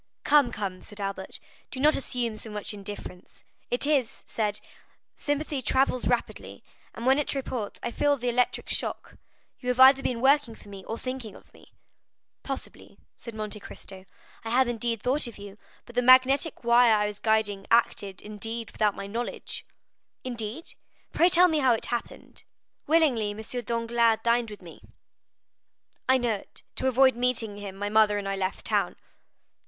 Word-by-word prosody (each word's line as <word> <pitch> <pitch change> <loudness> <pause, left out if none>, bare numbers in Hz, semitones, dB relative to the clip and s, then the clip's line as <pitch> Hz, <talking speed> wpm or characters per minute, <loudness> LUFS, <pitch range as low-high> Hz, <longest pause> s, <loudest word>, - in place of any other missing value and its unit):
"Come, 290 -4 +4
come," 195 -3 -4
said 210 -1 -14
Albert, 195 -1 -5 0.3
"do 260 - -7
not 300 +3 +4
assume 240 -4 -2
so 220 - -8
much 210 0 -4
indifference. 200 -3 -9 0.3
It 245 +3 0
is 280 -6 0
said, 210 -2 -2 0.6
sympathy 290 -1 -2
travels 260 +1 +1
rapidly, - - -3 0.3
and 235 - -6
when 265 +2 +4
at 295 - -1
Tréport, 255 -6 -3
I - - -2
felt 285 +2 +1
the 245 - -3
electric 250 +1 0
shock; - - -4 0.4
you 250 - -4
have 250 0 0
either 265 +1 +8
been 250 -3 -2
working 270 -2 +3
for 205 - -16
me 195 -1 -9
or 225 - -4
thinking 255 -5 -6
of - - -17
me." - - -20 0.7
"Possibly," 270 -1 -7 0.2
said 235 -2 -10
Monte 215 0 -5
Cristo, 190 -1 -11 0.4
"I 225 - -5
have 255 +2 +3
indeed 230 -2 -2
thought 260 +2 +1
of 235 - -10
you, 200 -1 -10 0.3
but 240 - -13
the 245 - +2
magnetic 260 +4 +5
wire 235 -1 +6
I 210 0 +1
was 210 -1 -5
guiding 215 -3 0
acted, 200 -4 +1
indeed, 220 +2 -5
without 210 -2 +1
my - - -6
knowledge." 230 +4 -5 0.6
30277m - - -3
"Indeed! 235 +5 -4 0.4
Pray 345 - +5
tell 360 +1 +6
me 315 -3 +1
how 260 -3 +4
it 225 - -2
happened." 240 -1 -6 0.4
"Willingly. 285 -9 +3
M. 205 +1 -7
Danglars 230 0 0
dined 235 -1 +2
with 205 -3 -11
me." 170 - -12 1.3
"I 260 - +6
know 240 -3 0
it; 200 - -9
to 265 - 0
avoid 260 0 +4
meeting 235 -4 -1
him, 200 -2 -7
my 205 +1 -3
mother 210 -1 +4
and 200 -1 -4
I 195 - -1
left 190 0 -3
town." - - +1
235 Hz, 170 wpm, -27 LUFS, 210-260 Hz, 1.3 s, either